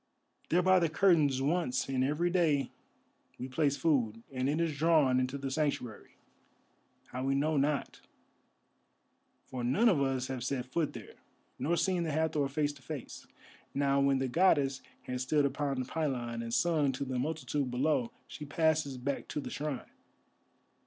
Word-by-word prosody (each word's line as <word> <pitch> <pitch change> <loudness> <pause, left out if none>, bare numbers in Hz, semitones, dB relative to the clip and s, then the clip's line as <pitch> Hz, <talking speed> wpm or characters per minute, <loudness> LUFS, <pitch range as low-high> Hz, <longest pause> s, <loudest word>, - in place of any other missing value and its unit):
There 180 +2 +3
by 185 0 +5
the 170 -2 +1
curtains, 155 -6 +3
once 150 -4 0
in 130 -1 0
every 150 +6 +1
day, 160 -6 +2 0.7
we 125 - -5
place 140 +1 +1
food, 115 -8 +1
and 130 0 -1
it 150 +3 0
is 165 -3 0
drawn 145 -4 +4
into 130 +2 -1
the 135 -1 -4
sanctuary, 135 -6 -3 0.9
how 125 +1 -4
we 135 +1 +1
know 155 +3 +1
not, 145 +1 0 1.4
for 125 -2 -5
none 190 - +3
of 175 -11 +4
us 135 -2 0
have 130 -2 -4
set 130 0 -2
foot 150 +4 -1
there, - - -10 0.4
nor 170 +3 +1
seen 185 -1 +1
the 165 -2 -1
Hathor 155 -2 +1
face 145 +1 0
to 140 - -17
face. - - -8 0.5
Now, 140 0 +2
when 140 0 +3
the 135 0 0
Goddess 140 -3 +3 0.2
has 125 0 -4
stood 145 +3 +2
upon 140 0 -1
the 130 - -2
pylon 125 -6 -2
and 115 0 -5
sung 155 0 +2
to 140 +2 -3
the 130 -1 -2
multitude 145 -1 -2
below, 155 - 0
she 150 - -9
passes 155 -2 +1
back 135 +3 -3
to - - -3
the - - -6
shrine. 150 -2 -4
140 Hz, 165 wpm, -31 LUFS, 130-155 Hz, 1.4 s, by